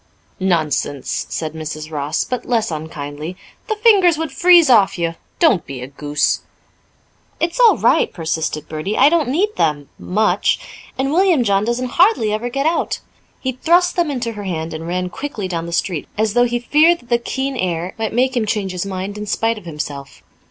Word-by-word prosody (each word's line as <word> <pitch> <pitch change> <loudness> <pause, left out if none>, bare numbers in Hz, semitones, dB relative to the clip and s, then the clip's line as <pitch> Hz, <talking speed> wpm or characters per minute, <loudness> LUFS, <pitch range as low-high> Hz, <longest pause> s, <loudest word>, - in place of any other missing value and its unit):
"Nonsense!" 155 -7 -1
said 155 -1 -4
Mrs. 155 0 -6
Ross, 150 0 -1
but 250 -1 -4
less 225 -5 0
unkindly. 155 +1 -6 0.3
"The 435 - -1
fingers 405 -7 +5
would 320 -2 -3
freeze 345 +2 +6
off 215 -8 +4
you. 170 -1 -1 0.2
Don't 315 - +3
be 135 -1 -6
a - - -4
goose." 145 +2 -1 1.0
"It's 340 +9 -1
all 475 -3 +6
right," 475 - +3
persisted 160 -2 -3
Bertie. 155 +7 -3
"I 285 - +6
don't 315 -5 +1
need 400 +10 0
them 145 -3 0
much. 210 +4 +1 0.4
And 270 +2 0
William 350 -6 +4
John 200 -1 +2
doesn't 245 +2 -1
hardly 360 - +4
ever 225 +3 -2
get 275 +3 -2
out." 330 +1 0 0.4
He 260 - -2
thrust 345 +7 +2
them 345 -3 +1
into 245 -4 -2
her 210 -2 -7
hand 165 -3 -3
and 160 +1 -6
ran 180 +1 -2
quickly 225 -8 -5
down 170 -2 -3
the - - -6
street, 170 -2 -2
as 215 -1 +1
though 245 +1 +4
he 240 0 0
feared 310 +8 +3
that 240 - -22
the 235 -1 +3
keen 265 +3 -3
air 180 -4 -2
might 220 -1 -1
make 255 +3 +1
him 225 -3 0
change 205 -3 -1
his 180 +1 -4
mind 195 +2 -5
in 210 - -6
spite 225 +2 0
of 195 - -19
himself. 150 -3 -7
210 Hz, 190 wpm, -19 LUFS, 165-275 Hz, 1.0 s, freeze